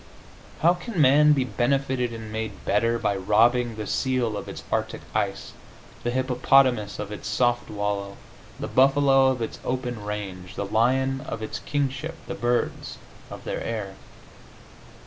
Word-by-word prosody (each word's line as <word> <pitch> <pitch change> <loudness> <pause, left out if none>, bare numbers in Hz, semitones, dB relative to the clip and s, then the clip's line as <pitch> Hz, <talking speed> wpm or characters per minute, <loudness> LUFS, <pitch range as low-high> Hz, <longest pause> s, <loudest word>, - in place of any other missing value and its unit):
How 170 +3 +6
can 180 +2 -5
man 150 +2 +6
be 135 -3 +2
benefitted 125 +2 0
and 110 -2 -7
made 110 -1 -5
better 115 +3 +2
by 105 -3 0
robbing 115 +5 +3
the 110 -1 -5
seal 125 -2 0
of 100 - -6
its - - -8
arctic - - -1
ice, - - -2 0.5
the 120 - 0
hippopotamus 125 -3 +2
of 105 -1 -5
its 105 - -6
soft 120 +1 +1
wallow, 100 -1 -3 0.4
the - - -3
buffalo 135 0 +4
of 130 -3 0
its 115 - -6
open 125 -4 -3
range, 95 -3 -6
the 100 - -2
lion 130 +5 +1
of 110 - -5
its 110 - -4
kingship, 145 +3 -2
the - - -5
birds 120 0 -1 0.3
of - - -9
their - - -4
air? 105 -4 -4
120 Hz, 150 wpm, -25 LUFS, 105-130 Hz, 0.5 s, How